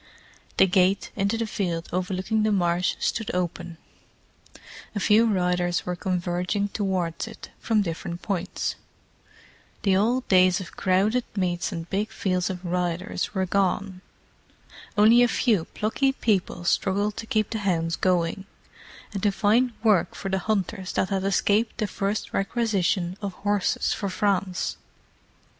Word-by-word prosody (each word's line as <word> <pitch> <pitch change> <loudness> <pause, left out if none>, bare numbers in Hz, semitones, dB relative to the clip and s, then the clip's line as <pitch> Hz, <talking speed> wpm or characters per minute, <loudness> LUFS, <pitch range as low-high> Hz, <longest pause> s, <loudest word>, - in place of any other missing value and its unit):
The - - +7
gate 190 +1 +2
into 200 +2 0
the 230 - -1
field 175 -6 -2
overlooking 185 +4 -1
the 215 0 +2
marsh 180 -2 +1
stood 225 -2 -1
open; 175 -1 -3 1.2
a - - 0
few 215 +3 +4
riders 180 -3 +1
were 180 - -2
converging 180 +2 -1
towards 190 -5 -2
it - - -11
from 220 -2 +1
different 170 0 -5
points. 185 -2 -2 1.1
The 195 -2 +3
old 240 +6 +1
days 185 -1 +5
of 190 - -9
crowded 200 +6 +2
meets 175 -3 -1
and 165 0 -5
big 205 +4 -1
fields 185 -4 -1
of 180 -1 -6
riders 180 +5 -2
were 190 0 +1
gone. 190 0 0 1.0
Only 225 +3 +7
a 245 - +6
few 220 -7 +1
plucky 270 +6 0
people 200 -8 0
struggled 200 +4 +1
to 225 - -6
keep 215 -2 0
the 220 - -2
hounds 165 -4 0
going, 185 +1 0 0.7
and 200 - -3
to 205 - +3
find 225 +5 +2
work 210 -5 +3
for 195 - -5
the 190 0 0
hunters 195 -1 -2
that 185 - 0
had 195 -2 -1
escaped 205 +3 +1
the 215 - 0
first 200 +2 -3
requisition 195 -4 0
of 200 -2 -3
horses 205 0 0
for 200 - -3
France. 190 -1 -1
195 Hz, 145 wpm, -25 LUFS, 180-210 Hz, 1.2 s, The